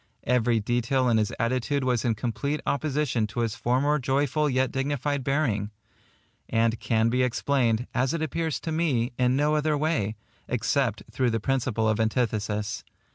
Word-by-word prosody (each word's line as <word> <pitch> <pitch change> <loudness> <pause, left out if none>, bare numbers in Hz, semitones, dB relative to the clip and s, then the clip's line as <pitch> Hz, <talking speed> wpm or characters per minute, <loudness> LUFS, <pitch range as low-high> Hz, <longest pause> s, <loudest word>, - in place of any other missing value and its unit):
Every 120 -2 +2
detail 120 +4 +1
in 115 - +3
his 105 -2 +1
attitude 130 +4 0
was 125 -3 +1
in 115 -3 +1
complete 140 +6 -2
opposition 140 -6 0
to 120 +3 -3
his 115 -2 0
former 130 +6 +1
joyful 145 +3 +1
yet 130 -1 +1
dignified 140 0 -1
bearing; 125 -8 0 0.8
and 115 0 +1
can 115 -1 +1
be 125 +2 +1
explained, 125 -2 +1
as 130 +1 +1
it 165 - -2
appears 160 0 -2
to 160 - -4
me, 135 -8 0
in 125 0 +3
no 150 +2 +2
other 150 0 +1
way, 140 -9 0 0.3
except 125 -1 0
through 125 +2 +1
the 115 0 0
principle 120 -2 0
of 110 0 +1
antithesis. 110 -2 -1
125 Hz, 160 wpm, -26 LUFS, 115-140 Hz, 0.8 s, in